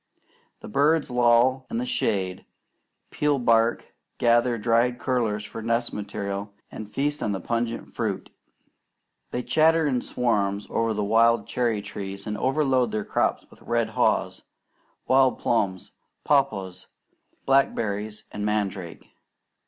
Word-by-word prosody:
The -, -, -9 dB
birds 145 Hz, +4 st, +2 dB
loll 125 Hz, +2 st, +3 dB
in 230 Hz, -, -3 dB
the 245 Hz, -, -1 dB
shade, 95 Hz, -, -1 dB, 0.6 s
peel 150 Hz, -1 st, +1 dB
bark, 115 Hz, -2 st, +2 dB, 0.2 s
gather 120 Hz, 0 st, +3 dB
dried 115 Hz, +2 st, +2 dB
curlers 115 Hz, -5 st, -1 dB
for 110 Hz, +1 st, -7 dB
nest 115 Hz, +1 st, -1 dB
material, 100 Hz, 0 st, -5 dB, 0.2 s
and 110 Hz, -1 st, -8 dB
feast 145 Hz, +5 st, -2 dB
on 105 Hz, -, -1 dB
the 95 Hz, -, -3 dB
pungent 115 Hz, +4 st, -3 dB
fruit. -, -, -3 dB, 1.0 s
They 125 Hz, -, -3 dB
chatter 160 Hz, +2 st, +3 dB
in 130 Hz, -4 st, +1 dB
swarms 100 Hz, -4 st, 0 dB
over 115 Hz, -1 st, 0 dB
the 105 Hz, -, -1 dB
wild 115 Hz, +1 st, +3 dB
cherry 115 Hz, -4 st, -1 dB
trees, 100 Hz, -1 st, -7 dB
and 105 Hz, -1 st, -3 dB
overload 130 Hz, -1 st, +1 dB
their 105 Hz, -1 st, -2 dB
crops -, -, 0 dB
with -, -, -18 dB
red -, -, 0 dB
haws, -, -, 0 dB, 0.6 s
wild 130 Hz, -1 st, +4 dB
plums, 95 Hz, -5 st, -1 dB, 0.3 s
papaws, 95 Hz, -11 st, 0 dB, 0.6 s
blackberries 110 Hz, -6 st, 0 dB
and 105 Hz, -, -5 dB
mandrake. 100 Hz, -5 st, -3 dB
115 Hz, 130 wpm, -25 LUFS, 105-130 Hz, 1.0 s, wild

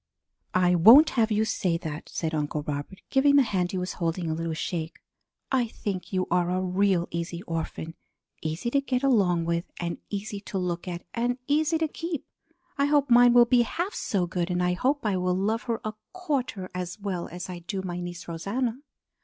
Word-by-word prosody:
"I 180 Hz, -1 st, +4 dB
won't 230 Hz, -, +8 dB
have 230 Hz, -3 st, +2 dB
you 215 Hz, +1 st, +2 dB
say 180 Hz, -5 st, 0 dB
that!" 155 Hz, -2 st, -6 dB
said 160 Hz, -1 st, -3 dB
Uncle 150 Hz, -1 st, -1 dB
Robert, 145 Hz, +6 st, -5 dB
giving 280 Hz, +1 st, +4 dB
the 280 Hz, -, +7 dB
hand 185 Hz, -6 st, 0 dB
he 190 Hz, -, -2 dB
was 180 Hz, 0 st, -3 dB
holding 170 Hz, +1 st, -1 dB
a 160 Hz, -, 0 dB
little 165 Hz, 0 st, -3 dB
shake. 165 Hz, 0 st, -3 dB, 0.5 s
"I 255 Hz, -3 st, +2 dB
think 200 Hz, -4 st, -5 dB
you 185 Hz, -1 st, 0 dB
are 175 Hz, 0 st, +2 dB
a 180 Hz, +1 st, 0 dB
real 185 Hz, -1 st, +1 dB
easy 170 Hz, +1 st, -4 dB
orphan: 165 Hz, -2 st, -4 dB, 0.5 s
easy 160 Hz, +9 st, -3 dB
to 280 Hz, -, +3 dB
get 255 Hz, -1 st, -1 dB
along 190 Hz, -10 st, +3 dB
with 170 Hz, 0 st, -1 dB
and 170 Hz, -1 st, -3 dB
easy 205 Hz, 0 st, -4 dB
to 200 Hz, -1 st, -5 dB
look 180 Hz, -1 st, -2 dB
at 175 Hz, -1 st, -5 dB
and 240 Hz, +1 st, 0 dB
easy 310 Hz, +3 st, +2 dB
to 320 Hz, 0 st, 0 dB
keep. 330 Hz, -1 st, -5 dB, 0.5 s
I 280 Hz, -, +4 dB
hope 285 Hz, -2 st, +2 dB
mine 240 Hz, 0 st, +7 dB
will 240 Hz, 0 st, +8 dB
be 245 Hz, 0 st, +4 dB
half 345 Hz, -, -2 dB
so 190 Hz, -4 st, 0 dB
good, 175 Hz, 0 st, -2 dB
and 180 Hz, 0 st, 0 dB
I 180 Hz, 0 st, +2 dB
hope 265 Hz, +8 st, 0 dB
I 200 Hz, -3 st, +1 dB
will 180 Hz, 0 st, 0 dB
love 215 Hz, +4 st, 0 dB
her 230 Hz, -, 0 dB
a 215 Hz, -, -2 dB, 0.2 s
quarter 265 Hz, -, -3 dB
as 180 Hz, +2 st, -5 dB
well 190 Hz, -4 st, -3 dB
as 180 Hz, +2 st, -7 dB
I 180 Hz, -1 st, -6 dB
do 190 Hz, +3 st, -4 dB
my 175 Hz, -1 st, -4 dB
niece 175 Hz, -1 st, -6 dB
Rosanna." 220 Hz, +9 st, -2 dB
185 Hz, 205 wpm, -27 LUFS, 175-240 Hz, 0.5 s, won't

